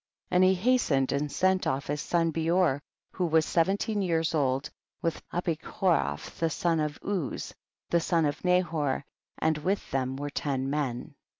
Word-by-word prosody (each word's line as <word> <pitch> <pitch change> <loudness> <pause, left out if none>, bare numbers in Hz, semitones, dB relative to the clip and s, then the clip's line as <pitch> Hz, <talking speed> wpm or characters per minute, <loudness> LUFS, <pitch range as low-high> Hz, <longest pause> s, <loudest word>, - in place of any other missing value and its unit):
54. - - 0
And 180 - +6
he 185 +1 +5
hastened 180 - +2
and 145 +1 -1
sent 185 +3 +2
off 135 +1 -1
his 145 +1 -2
son 165 -1 +1
Beor, 165 -2 +2 0.3
who 180 - -1
was 160 -1 +3
seventeen 200 +5 +1
years 165 -4 +1
old, 135 -2 +1 0.4
with 165 - -1
Abichorof 175 +1 -1
the 165 - +2
son 165 +1 +1
of 150 -1 -2
LJz, 190 -8 -3 0.4
the 170 - +4
son 165 -1 +2
of 145 - -2
Nahor, 165 -7 +1 0.3
and 160 -1 +1
with 190 +6 -1
them 130 -1 -1
were 145 +1 -4
ten 135 -2 -1
men. 135 -5 -2
160 Hz, 165 wpm, -28 LUFS, 145-180 Hz, 0.4 s, And